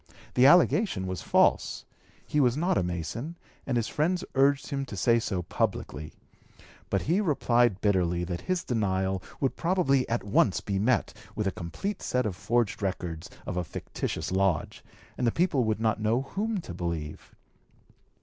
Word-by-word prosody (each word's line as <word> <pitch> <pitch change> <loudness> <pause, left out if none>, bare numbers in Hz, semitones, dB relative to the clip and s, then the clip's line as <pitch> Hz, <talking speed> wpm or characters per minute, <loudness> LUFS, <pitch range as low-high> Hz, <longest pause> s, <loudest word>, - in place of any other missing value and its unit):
The 125 +2 +6
allegation 175 - +4
was 95 -3 -4
false; - - +2 0.4
he 150 - 0
was 125 -1 +3
not 175 +4 +1
a - - +2
Mason, 90 - -4 0.3
and 125 -3 +1
his 115 - 0
friends 175 +4 0
urged 140 +2 +2
him 140 -1 -1
to 100 - -7
say 115 +5 +4
so 95 -5 -2
publicly; 75 -2 -2 0.8
but - - 0
he 175 +7 +2
replied 120 - +2
bitterly 90 -4 +1
that 90 0 -4
his 185 -2 -1
denial 95 -5 0 0.2
would 135 - 0
probably 150 -7 +1
at 115 +1 0
once 100 -1 +2
be 100 -1 -2
met 115 +2 +1 0.2
by 105 - +1
a 95 - +1
complete 185 - -5
set 125 -1 0
of 100 -4 -2
forged 110 +3 0
records 90 -4 -3 0.2
of 90 - -4
a 90 - 0
fictitious 80 - -4
lodge, 95 -4 0 0.4
and 125 - +2
the - - +3
people 160 -7 +1
would 110 -1 0
not 110 -1 0
know 115 +5 +1
whom 205 +6 -2
to 90 - -8
believe. 85 -3 -5
115 Hz, 170 wpm, -28 LUFS, 95-140 Hz, 0.8 s, The